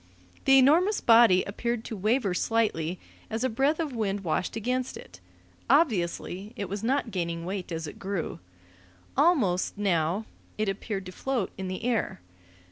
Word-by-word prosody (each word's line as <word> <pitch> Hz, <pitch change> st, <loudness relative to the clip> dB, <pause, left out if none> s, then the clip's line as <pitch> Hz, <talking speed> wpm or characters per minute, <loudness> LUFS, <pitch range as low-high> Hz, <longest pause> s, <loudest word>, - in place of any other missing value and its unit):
The 270 Hz, 0 st, +7 dB
enormous 330 Hz, +10 st, +5 dB
body 230 Hz, -5 st, +6 dB
appeared 235 Hz, +3 st, -3 dB
to 225 Hz, -, -5 dB
waver 215 Hz, 0 st, +1 dB
slightly 180 Hz, -5 st, 0 dB, 0.3 s
as 225 Hz, +2 st, -2 dB
a 260 Hz, -, +2 dB
breath 275 Hz, +7 st, +1 dB
of 310 Hz, -5 st, -2 dB
wind 205 Hz, -3 st, -1 dB
washed 180 Hz, +2 st, -1 dB
against 250 Hz, +3 st, -2 dB
it: 85 Hz, 0 st, -13 dB, 0.5 s
obviously 210 Hz, -, +1 dB
it 205 Hz, -5 st, -4 dB
was 200 Hz, +3 st, -5 dB
not 260 Hz, 0 st, 0 dB
gaining 170 Hz, -3 st, -3 dB
weight 185 Hz, -1 st, -4 dB
as 165 Hz, -1 st, -3 dB
it 150 Hz, -, -9 dB
grew. 195 Hz, -4 st, -3 dB, 0.8 s
Almost, 260 Hz, -, +2 dB
now, 185 Hz, 0 st, +1 dB, 0.3 s
it 215 Hz, 0 st, 0 dB
appeared 195 Hz, 0 st, -3 dB
to 185 Hz, -, -7 dB
float 245 Hz, +1 st, -2 dB
in 190 Hz, -1 st, -5 dB
the 185 Hz, +4 st, -5 dB
air. 230 Hz, -, -1 dB
210 Hz, 155 wpm, -27 LUFS, 185-250 Hz, 0.8 s, The